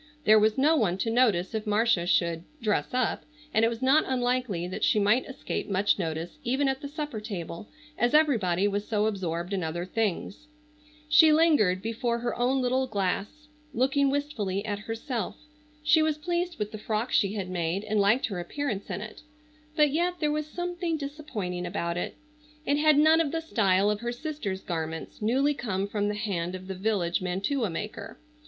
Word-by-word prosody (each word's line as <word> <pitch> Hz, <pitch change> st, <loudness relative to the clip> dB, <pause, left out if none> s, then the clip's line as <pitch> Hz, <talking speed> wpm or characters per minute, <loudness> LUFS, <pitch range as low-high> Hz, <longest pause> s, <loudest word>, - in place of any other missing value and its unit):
There 215 Hz, -5 st, +6 dB
was 215 Hz, +2 st, +2 dB
no 300 Hz, +5 st, +4 dB
one 200 Hz, -, +1 dB
to 225 Hz, +4 st, -1 dB
notice 225 Hz, -7 st, +2 dB
if 220 Hz, 0 st, -3 dB
Marcia 210 Hz, -4 st, +2 dB
should 170 Hz, -2 st, +1 dB, 0.2 s
"dress 215 Hz, -4 st, 0 dB
up," 250 Hz, -2 st, 0 dB, 0.3 s
and 220 Hz, -, +3 dB
it -, -, +6 dB
was 230 Hz, +2 st, -4 dB
not 275 Hz, +4 st, +5 dB
unlikely 245 Hz, -8 st, 0 dB
that 185 Hz, -, -5 dB
she -, -, +3 dB
might 210 Hz, +5 st, +3 dB
escape 265 Hz, -, -4 dB
much 200 Hz, +1 st, +2 dB
notice 165 Hz, 0 st, -4 dB
even 265 Hz, +4 st, +1 dB
at 265 Hz, +1 st, -1 dB
the 285 Hz, -, -5 dB
supper 295 Hz, -5 st, -5 dB
table, 195 Hz, -2 st, -6 dB, 0.3 s
as 240 Hz, +4 st, +2 dB
everybody 205 Hz, -, +3 dB
was 205 Hz, 0 st, -2 dB
so 210 Hz, -2 st, +1 dB
absorbed 180 Hz, -3 st, -2 dB
in 190 Hz, -3 st, -1 dB
other 170 Hz, +2 st, -3 dB
things. 215 Hz, -, -2 dB, 0.6 s
She 305 Hz, +1 st, +7 dB
lingered 295 Hz, -, +3 dB
before 230 Hz, +1 st, -1 dB
her 240 Hz, 0 st, -2 dB
own 255 Hz, +2 st, +1 dB
little 260 Hz, +1 st, +1 dB
glass 205 Hz, +8 st, -2 dB, 0.3 s
looking 275 Hz, +3 st, +2 dB
wistfully 220 Hz, -9 st, -2 dB
at 205 Hz, -2 st, -2 dB
herself. 225 Hz, +3 st, -4 dB, 0.5 s
She 300 Hz, +1 st, +5 dB
was 310 Hz, -1 st, +1 dB
pleased 345 Hz, +2 st, -2 dB
with 210 Hz, -2 st, -3 dB
the 215 Hz, -, -7 dB
frock 220 Hz, +3 st, -2 dB
she 200 Hz, 0 st, +2 dB
had 190 Hz, -3 st, -4 dB
made 175 Hz, +2 st, -1 dB
and 215 Hz, 0 st, 0 dB
liked 205 Hz, +6 st, +3 dB
her 195 Hz, -5 st, -4 dB
appearance 205 Hz, +3 st, -4 dB
in -, -, -3 dB
it, 215 Hz, 0 st, -9 dB, 0.5 s
but 300 Hz, -3 st, +4 dB
yet 350 Hz, +4 st, +1 dB
there 300 Hz, -2 st, +1 dB
was 305 Hz, 0 st, -2 dB
something 350 Hz, 0 st, -3 dB
disappointing 240 Hz, -, -5 dB
about 170 Hz, -2 st, -2 dB
it. 175 Hz, -, -3 dB, 0.5 s
It 285 Hz, -, +2 dB
had 305 Hz, -1 st, +5 dB
none 315 Hz, +2 st, +6 dB
of 300 Hz, -4 st, -1 dB
the 330 Hz, -, -1 dB
style 205 Hz, -10 st, +2 dB
of 210 Hz, -, -2 dB
her 240 Hz, +1 st, -3 dB
sister's 245 Hz, -8 st, -4 dB
garments, 160 Hz, 0 st, -5 dB
newly 265 Hz, +7 st, +2 dB
come 200 Hz, -7 st, -2 dB
from 205 Hz, 0 st, -1 dB
the 210 Hz, -, -1 dB
hand 185 Hz, -4 st, -2 dB
of 185 Hz, 0 st, -8 dB
the 190 Hz, -, -5 dB
village 190 Hz, -3 st, 0 dB
mantua 200 Hz, +7 st, -1 dB
maker. 210 Hz, +4 st, -6 dB
220 Hz, 190 wpm, -27 LUFS, 190-280 Hz, 0.6 s, She